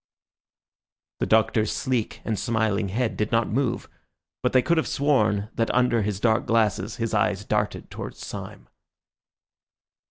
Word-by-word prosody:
The - - 0
Doctor's 110 -1 +3
sleek 125 -5 -2
and 110 -3 -1
smiling 110 -2 0
head 115 +4 -1
did 105 +1 -1
not 115 0 +2
move, 125 0 -1 0.5
but - - +1
they 130 -1 +4
could 170 0 +2
have 160 - +1
sworn 110 -8 +1
that 115 - 0
under 125 -2 +3
his 100 -2 -2
dark 110 0 +2
glasses 105 -2 +1
his 115 -1 -3
eyes 105 -2 +1
darted 105 0 -2
towards - - -7
Syme. - - -8
110 Hz, 140 wpm, -25 LUFS, 105-120 Hz, 0.5 s, they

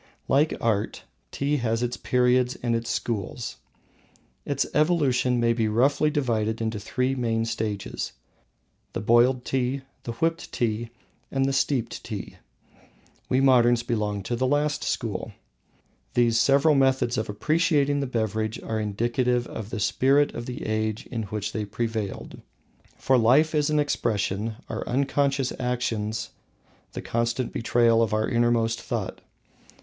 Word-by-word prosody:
Like 145 +3 +3
Art, 110 -3 -1 0.3
Tea 145 +2 0
has 115 -2 0
its 120 0 -1
periods 125 0 +2
and 120 -1 +1
its 115 0 -3
schools. 115 +1 -3 0.9
Its 140 -1 0
evolution 140 -6 +2
may 115 0 +3
be 115 -2 0
roughly 135 +7 +3
divided 115 -6 0
into 110 -1 -2
three 125 +5 -1
main 115 -3 0
stages: 110 -3 -3 0.8
the - - -2
Boiled 120 +3 +3
Tea, 130 +1 -1 0.2
the 115 - -5
Whipped 165 +7 -1
Tea, 115 0 -1 0.4
and 135 0 +1
the 135 - 0
Steeped 135 -2 0
Tea. - - -6 0.9
We 130 - +3
moderns 120 -3 +4
belong 105 -4 -2
to 120 - -2
the 130 +2 0
last 145 +2 +1
school. - - -3 0.8
These 120 -2 +3
several 140 +4 +4
methods 130 -3 +2
of 110 - -2
appreciating 145 +4 +2
the 140 - -1
beverage 110 -2 -2
are 110 -1 -2
indicative 120 +4 0
of 110 -3 -7
the 115 - -4
spirit 135 +7 +3
of 120 - -6
the 125 - -5
age 110 0 -1
in 115 -3 -3
which 105 0 -3
they 110 - -2
prevailed. 110 -1 -4 0.6
For 130 -1 +3
life 135 +8 +4
is 150 -1 +2
an 155 - +1
expression, 110 -6 -1
our - - -4
unconscious 135 +1 +1
actions 115 -4 -2 0.6
the - - -6
constant 115 +2 -1
betrayal 115 -1 +3
of 110 -2 +1
our 110 0 +1
innermost 115 -1 +1
thought. - - -4
120 Hz, 140 wpm, -25 LUFS, 110-135 Hz, 0.9 s, moderns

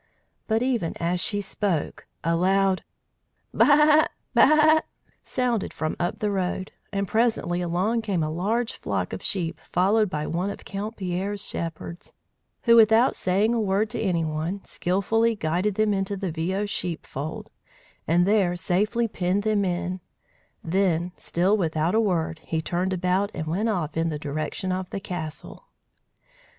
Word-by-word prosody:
But 225 +1 +1
even 240 -10 -1
as 175 +1 0
she 205 +4 0
spoke, 195 -4 -2 0.2
a 165 +1 +2
loud 190 +2 +2 0.7
"Baa! 300 +1 +6 0.3
Baa!" 310 +2 +6 0.4
sounded 245 -5 -1
from 155 0 -2
up 175 0 -1
the 210 -1 -1
road, 190 -1 -2 0.2
and 200 -1 -1
presently 220 -5 +1
along 185 +7 0
came 195 -7 -1
a 155 - -2
large 220 +8 -1
flock - - -2
of - - -5
sheep 165 -5 -2
followed 200 +4 +2
by 150 -3 -3
one 175 +5 -1
of - - -8
Count 205 +3 -5
Pierre's 195 +2 -2
shepherds, 165 +1 -6 0.5
who, 235 -1 +6
without 225 +2 +6
saying 200 +5 +1
a 230 - +1
word 205 +1 +1
to - - -3
any 175 -6 +1
one, 160 +5 -3
skilfully 220 +6 +1
guided 180 +3 0
them 215 0 +2
into 195 0 -1
the 190 -2 -3
Viaud 185 +6 -1
sheepfold, 160 -6 -5 0.6
and 175 +2 +4
there 195 -3 +3
safely 210 +6 +1
penned 190 0 -1
them 215 -2 +2
in; 180 0 -2 0.6
then, 175 -1 +1
still 185 +5 +1
without 165 -3 0
a 225 - +4
word, 165 -6 0
he 160 0 -3
turned 180 +3 -1
about 185 +2 +1
and 155 - -3
went 190 +8 0
off 175 -8 -2
in 165 +1 +1
the 155 - -3
direction 155 +6 -3
of 185 0 -3
the - - -4
castle. 175 - -7
190 Hz, 155 wpm, -25 LUFS, 170-210 Hz, 0.7 s, Baa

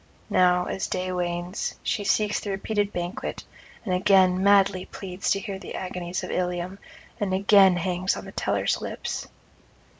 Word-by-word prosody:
Now, 180 0 +4
as 190 - -3
day 185 0 -2
wanes, 175 +1 -2
she 205 - -1
seeks 210 0 +2
the 205 - -6
repeated 205 +1 -1
banquet, 180 +9 -4 0.4
and 185 - -1
again 185 0 +4
madly 195 -2 +4
pleads 190 -1 -5
to 195 - +2
hear 195 0 -5
the - - -8
agonies 180 -1 -4
of - - -5
Ilium, 180 +1 -2 0.4
and 195 -3 0
again 195 -1 +6
hangs 180 +2 0
on - - -7
the - - -9
teller's - - 0
lips. - - -4
185 Hz, 155 wpm, -25 LUFS, 180-200 Hz, 0.4 s, again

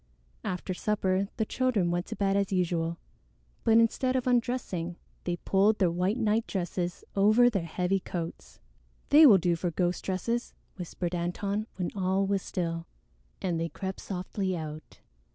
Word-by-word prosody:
After 180 +1 -3
supper 195 0 0
the 220 - +1
children 215 -9 +1
went 175 +1 -1
to - - -5
bed 195 0 +1
as 200 -1 +1
usual, 170 -2 0 0.7
but 225 0 +5
instead 255 +3 +2
of 255 - 0
undressing, 235 -9 0 0.3
they 175 - 0
pulled 200 +4 +2
their 180 -4 +3
white 180 +6 0
nightdresses 195 -6 -1
over 215 +5 +5
their 195 -6 -1
heavy 180 +3 0
coats. 170 -2 -6 0.5
"They 300 +1 +9
will 210 -7 +8
do 175 -1 +1
for 175 +2 -2
ghost 175 +2 -1
dresses," 230 +6 -2 0.2
whispered 175 -1 -4
Antone 195 +5 -2
when 180 -2 -2
all 190 0 +1
was 195 0 0
still, 165 -2 -3 0.6
and 175 -3 0
they 165 0 -1
crept 190 +1 -5
softly 185 0 -3
out. 155 -1 -8
190 Hz, 150 wpm, -29 LUFS, 175-210 Hz, 0.7 s, They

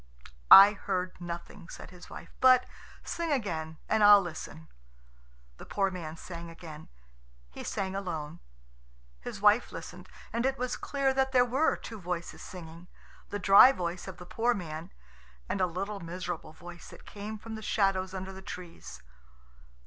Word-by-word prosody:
"I 195 +1 +11
heard 185 -2 -3
nothing," 175 +1 -8
said - - -10
his 180 -1 -13
wife; 170 - -10
"but 255 -1 +6 0.4
sing 335 -2 -3
again, 160 - -2
and 220 -1 +2
I'll 205 0 +9
listen." 160 -3 -7 0.9
The - - -11
poor 195 -1 0
man 165 -3 -7
sang 170 0 -8
again. 160 -2 -11 0.6
He - - -8
sang 190 -1 -3
alone. 170 -5 -5 0.8
His - - -8
wife - - +4
listened, - - -9 0.2
and 235 +1 0
it 265 +1 0
was 250 0 -2
clear 275 -1 -1
that 265 0 0
there 250 -1 +5
were 265 +6 +1
two 220 -3 -9
voices 175 -1 -5
singing 170 -1 -10 0.4
the 205 - -3
dry 200 +6 +8
voice 175 -6 -4
of 190 - -8
the 180 - -10
poor 235 +6 0
man, 165 -2 -7 0.6
and 195 - -2
a 185 - +3
little 195 +4 -4
miserable 170 -2 -6
voice 175 +1 -12
that - - -14
came 210 +1 -7
from 220 +1 -9
the 220 - -6
shadows 195 -3 0
under 190 0 -6
the 190 - -10
trees. 180 - -10
185 Hz, 160 wpm, -29 LUFS, 170-215 Hz, 0.9 s, I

